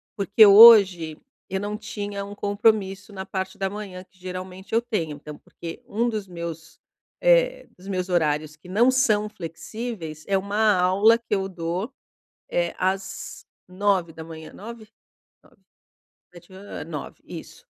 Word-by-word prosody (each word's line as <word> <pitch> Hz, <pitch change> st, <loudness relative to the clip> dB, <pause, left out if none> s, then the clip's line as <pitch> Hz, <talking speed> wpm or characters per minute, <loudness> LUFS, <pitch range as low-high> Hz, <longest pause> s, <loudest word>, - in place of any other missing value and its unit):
porque 205 Hz, +1 st, +5 dB
hoje 195 Hz, -7 st, +8 dB, 0.3 s
eu 190 Hz, -, -2 dB
não 205 Hz, +1 st, -3 dB
tinha 205 Hz, -2 st, -5 dB
um 200 Hz, +1 st, -9 dB
compromisso 205 Hz, -1 st, 0 dB
na 190 Hz, -1 st, -6 dB
parte 190 Hz, -1 st, -4 dB
da 195 Hz, 0 st, -1 dB
manhã, 195 Hz, -3 st, -7 dB
que 185 Hz, 0 st, -30 dB
geralmente 185 Hz, +1 st, -8 dB
eu 230 Hz, -, +4 dB
tenho. 205 Hz, -11 st, -3 dB
Então 150 Hz, +1 st, -10 dB
porque 165 Hz, +6 st, -10 dB
um 235 Hz, 0 st, 0 dB
dos 215 Hz, -3 st, -4 dB
meus, 170 Hz, -2 st, -8 dB, 0.4 s
eh, -, -, +3 dB
dos 185 Hz, +2 st, -14 dB
meus 185 Hz, -1 st, -3 dB
horários 155 Hz, -3 st, 0 dB
que 155 Hz, +4 st, -16 dB
não 225 Hz, +7 st, +4 dB
são 215 Hz, -5 st, +2 dB
flexíveis, 170 Hz, -2 st, -7 dB
é 195 Hz, -, +2 dB
uma 205 Hz, +2 st, +2 dB
aula 200 Hz, +5 st, +5 dB
que 230 Hz, -2 st, -6 dB
eu 190 Hz, -1 st, -1 dB
dou, 175 Hz, +5 st, -4 dB, 0.6 s
eh, -, -, 0 dB
às 190 Hz, +1 st, -3 dB, 0.2 s
9h, 170 Hz, -5 st, -2 dB
9h? 220 Hz, 0 st, -10 dB, 0.5 s
9h, -, -, -24 dB, 0.8 s
7h30, 185 Hz, +3 st, -11 dB
eh, -, -, -5 dB
9h, -, -, -7 dB
isso, -, -, -11 dB
195 Hz, 145 wpm, -24 LUFS, 180-215 Hz, 0.8 s, hoje